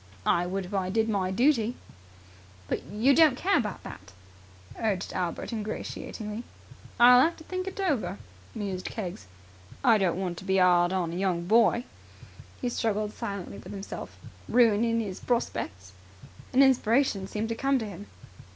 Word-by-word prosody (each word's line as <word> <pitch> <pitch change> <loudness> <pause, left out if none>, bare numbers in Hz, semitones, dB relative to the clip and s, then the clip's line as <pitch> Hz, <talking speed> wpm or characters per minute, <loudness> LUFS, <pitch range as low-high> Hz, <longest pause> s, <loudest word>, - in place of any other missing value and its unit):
"I 175 +1 +2
would 190 +1 -3
if 180 - -10
I 190 -2 0
did 220 +3 +1
my 195 -3 0
duty." 240 +2 +2 0.9
"But - - -2
you 225 +7 +2
don't 305 -4 +5
care 390 +6 +2
about 210 -6 -4
that," - - -11 0.7
urged 205 -4 -1
Albert 180 +5 -3
ingratiatingly. 215 0 -5 0.6
"I'll 245 +1 +8
have 330 +4 +2
to 320 - -12
think 370 +2 -4
it 385 - -6
over," 230 - -1 0.4
mused 195 -4 -4
Keggs. 180 - -6 0.6
"I 225 -3 +5
don't 180 -3 +1
want 180 -3 -3
to - - -11
be 190 0 +2
'ard 175 -1 +4
on 175 -3 -1
a - - -4
young 180 -3 0
boy." 230 +4 +4 0.8
He 250 - -2
struggled 215 -3 -1
silently 200 -1 -6
with - - -10
himself. 195 0 -7 0.3
"Ruinin' 230 -1 +3
'is 195 -4 -5
prospecks!" 105 - -2 0.6
An 265 +2 +6
inspiration 240 -5 +2
seemed 215 +3 -3
to - - 0
come 275 +4 +1
to 230 - -3
him. 180 - -9
210 Hz, 160 wpm, -28 LUFS, 185-240 Hz, 0.9 s, I'll